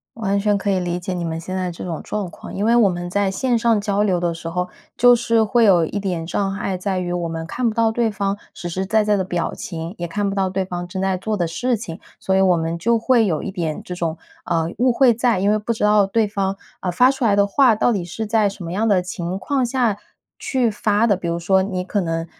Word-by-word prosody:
完 200 -3 0
全 205 0 +2
可 200 0 -1
以 190 - +1
理 175 -1 -2
解 180 +1 -4
你 175 -1 -3
们 165 -1 -3
现 185 +2 -6
在 185 -1 -1
这 170 - -8
种 170 -3 -4
状 205 -4 -4
况。 - - -11
因 200 - -2
为 230 +2 +3
我 230 -4 +5
们 175 -1 -4
在 200 +1 +1
线 235 +5 0
上 230 -2 +2
交 205 0 0
流 195 -4 +2
的 175 -1 -1
时 165 0 -8
候， 180 +2 -2 0.3
就 245 0 +6
是 230 -1 +2
会 230 +2 +3
有 180 -5 +5
一 205 - -3
点 180 -5 -3
障 195 +3 -1
碍， 195 -1 -2
在 185 0 -2
于 180 -1 -3
我 175 -1 -2
们 165 0 -5
看 240 +9 -2
不 215 - -5
到 225 -1 +3
对 230 0 +1
方 200 -1 -2 0.2
实 175 - -6
实 185 +3 -2
在 220 +2 +2
在 210 -1 +2
的 190 - -1
表 175 -2 -2
情， 165 0 -6
也 175 - -4
看 200 +4 -1
不 195 - -4
到 190 -1 +1
对 190 +1 -1
方 175 -1 -5
正 190 +1 -4
在 190 -1 0
做 215 +4 -2
的 175 -4 0
事 245 +9 0
情， 200 -7 -7 0.2
所 190 - -1
以 190 - +4
我 185 -2 +4
们 165 0 -2
就 230 +6 +2
会 230 0 +3
有 165 -6 -1
一 200 - -4
点 165 -5 -3
这 180 - -6
种， 170 -2 -3 0.3
呃， 165 -1 0
误 250 +1 +3
会 250 -1 +5
在， 235 -3 +1
因 200 +2 +2
为 215 - +3
不 215 +2 -2
知 220 - -4
道 210 -1 +4
对 220 +3 +2
方， 195 -2 -2 0.2
呃， 185 - -3
发 250 +9 +4
出 265 -3 -2
来 205 -3 +4
的 200 0 +4
话， 235 +3 +4
到 230 - +2
底 195 -6 -1
是 220 +6 -5
在 215 -1 +2
什 200 -1 -6
么 165 - -5
样 210 +5 0
的 195 -4 +3
情 180 0 -4
况 265 +5 0
下 240 -4 0 0.4
去 255 -3 +1
发 210 +1 +1
的。 205 -5 +3
比 175 - -5
如 170 0 -1
说 190 +3 +2
你 190 -1 -2
可 195 +3 -1
能， 165 -2 -2
195 Hz, 295 characters per minute, -21 LUFS, 175-220 Hz, 0.4 s, 就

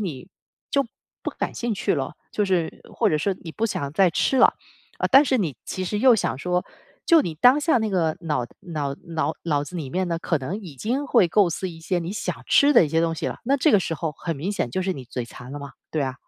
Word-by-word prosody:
你 175 -4 -5 0.4
就 275 -1 +3 0.4
不 - - -1
感 - - -1
兴 240 -1 -2
趣 - - 0
了， - - -2 0.2
就 210 - +1
是 180 -4 -1
或 - - +2
者 155 - +2
是 190 +4 0
你 165 - -6
不 225 - -2
想 140 -9 -3
再 185 +3 +4
吃 265 - +1
了， - - +9 0.5
啊， - - +1
但 275 +2 +8
是 260 -2 +2
你 155 - -1
其 185 - -4
实 205 +3 -2
又 255 -2 +7
想 135 -9 -1
说 180 +3 -1 0.4
就 335 -3 +7
你 165 - -4
当 250 - +5
下 295 -4 +3
那 220 -1 -1
个 165 -4 +1
脑 150 -7 -1
脑 150 -5 -3 0.2
脑 155 0 0
脑 145 -3 +1
子 145 - -11
里 140 -6 -5
面 185 +3 0
呢， 165 -1 -1
可 160 -5 0
能 155 +11 -4
已 165 -9 -10
经 250 - -1
会 230 -10 +4
构 190 -1 +4
思 185 +3 -3
一 165 - -11
些 175 +2 -1
你 170 +3 -4
想 - - -3
吃 285 +1 +6
的 180 - +7
一 - - -3
些 165 +2 +2
东 165 0 +1
西 - - -3
了， - - -4
那 275 +3 +3
这 300 +3 +3
个 205 - +6
时 170 - -3
候 160 -1 -3
很 165 -3 -4
明 180 +9 -3
显 125 -12 -2
就 185 - -1
是 190 - 0
你 135 -7 -8
嘴馋 125 +1 -7
了 145 - -5
嘛， 140 -1 -8 0.2
对 155 - -1
啊。 130 -1 -2
175 Hz, 280 characters per minute, -24 LUFS, 150-210 Hz, 0.5 s, 了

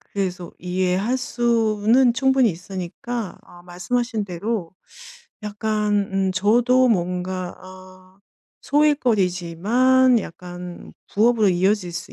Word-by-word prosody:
그래서 185 -3 -5
이해할 185 +6 -1
수는 235 -1 +2
충분히 265 -1 +3
있으니까 190 +5 -6
아 175 0 -17
말씀하신 220 +6 -2
대로 185 0 -4 0.7
약간 210 0 -1 0.2
음 195 -1 0
저도 240 +6 +3
뭔가 180 -2 -2
아 185 0 -15 0.4
소일거리지만 245 - +2
약간 175 0 -9 0.2
부업으로 220 -1 +3
이어질 185 0 +1
수 175 +4 -7
200 Hz, 230 characters per minute, -22 LUFS, 180-235 Hz, 0.7 s, 충분히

